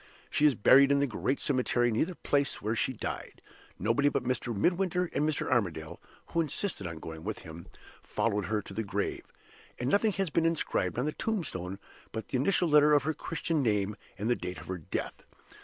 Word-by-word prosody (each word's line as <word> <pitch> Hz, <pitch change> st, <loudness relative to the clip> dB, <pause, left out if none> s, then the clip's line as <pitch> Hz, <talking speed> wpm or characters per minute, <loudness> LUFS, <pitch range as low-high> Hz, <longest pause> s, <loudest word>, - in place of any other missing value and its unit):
She 150 Hz, -, +4 dB
is 140 Hz, -, +3 dB
buried 135 Hz, +6 st, +6 dB
in 140 Hz, -, +5 dB
the 140 Hz, -, +3 dB
great 135 Hz, +1 st, -1 dB
cemetery, 125 Hz, -3 st, +2 dB
near 110 Hz, -, +2 dB
the 180 Hz, +1 st, -7 dB
place 140 Hz, -3 st, 0 dB
where 110 Hz, +3 st, -1 dB
she 130 Hz, -, 0 dB
died. 125 Hz, -, -5 dB, 0.4 s
Nobody 115 Hz, +9 st, +2 dB
but 135 Hz, -, -1 dB
Mr. 125 Hz, -1 st, -1 dB
Midwinter 180 Hz, -, +1 dB
and 150 Hz, +1 st, +1 dB
Mr. 155 Hz, -, -2 dB
Armadale 80 Hz, -8 st, -1 dB, 0.3 s
(who 170 Hz, -, +1 dB
insisted 155 Hz, -, -2 dB
on 85 Hz, -1 st, -6 dB
going 80 Hz, 0 st, -8 dB
with -, -, -4 dB
him) 80 Hz, +1 st, -9 dB, 0.3 s
followed 105 Hz, -2 st, -1 dB
her 105 Hz, +1 st, -1 dB
to 100 Hz, -, -10 dB
the 110 Hz, -, -1 dB
grave; 100 Hz, -1 st, -3 dB, 0.5 s
and 125 Hz, +2 st, 0 dB
nothing 210 Hz, +1 st, +3 dB
has 195 Hz, -5 st, -1 dB
been 165 Hz, +1 st, +3 dB
inscribed 165 Hz, -6 st, 0 dB
on 125 Hz, -, +1 dB
the 155 Hz, -, 0 dB
tombstone 115 Hz, -, -3 dB, 0.3 s
but 110 Hz, 0 st, -5 dB
the -, -, 0 dB
initial 175 Hz, +6 st, +2 dB
letter 150 Hz, -1 st, +6 dB
of 145 Hz, -, +3 dB
her 155 Hz, +2 st, 0 dB
Christian 165 Hz, 0 st, -2 dB
name 105 Hz, -4 st, +1 dB, 0.2 s
and 105 Hz, +2 st, -2 dB
the 120 Hz, -, +3 dB
date 90 Hz, -4 st, -5 dB
of -, -, -9 dB
her 95 Hz, -1 st, -4 dB
death. 75 Hz, -, -4 dB
125 Hz, 205 wpm, -30 LUFS, 105-155 Hz, 0.5 s, buried